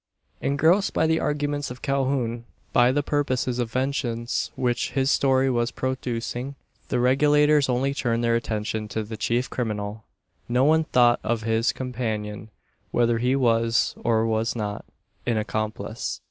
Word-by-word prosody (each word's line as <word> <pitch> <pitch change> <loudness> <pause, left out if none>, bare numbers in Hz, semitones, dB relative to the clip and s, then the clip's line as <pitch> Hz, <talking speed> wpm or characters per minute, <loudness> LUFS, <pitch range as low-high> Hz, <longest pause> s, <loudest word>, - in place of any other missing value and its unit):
Engrossed 160 +8 +2
by 160 - +3
the 160 0 +2
arguments 145 -1 -1
of 125 +1 -10
Calhoun 130 -4 -1 0.3
by 120 +1 +5
the 145 +2 0
purposes 130 -4 -1
of 120 -2 -2
vengeance 125 -2 -1
which 120 -1 -1
his 135 0 +2
story 135 -1 +3
was 120 -2 +1
producing 130 0 -3 0.3
the 125 - 0
Regulators 145 +3 +4
only 130 +2 +1
turned 120 -4 -1
their 115 0 +2
attention 110 -1 -2
to 110 +1 -3
the 110 +1 -7
chief 120 +3 0
criminal. 105 -2 -4 0.5
No 125 +2 +3
one 160 +2 +4
thought 120 -4 +4
of 110 0 -1
his 115 +1 +1
companion 110 -5 -4 0.4
whether 120 -1 +2
he 125 +3 +2
was, 115 -2 +2
or 115 -1 +2
was 110 +1 0
not, 105 -2 -4 0.4
an 115 -2 +1
accomplice. 110 +1 -3
120 Hz, 145 wpm, -25 LUFS, 115-135 Hz, 0.5 s, by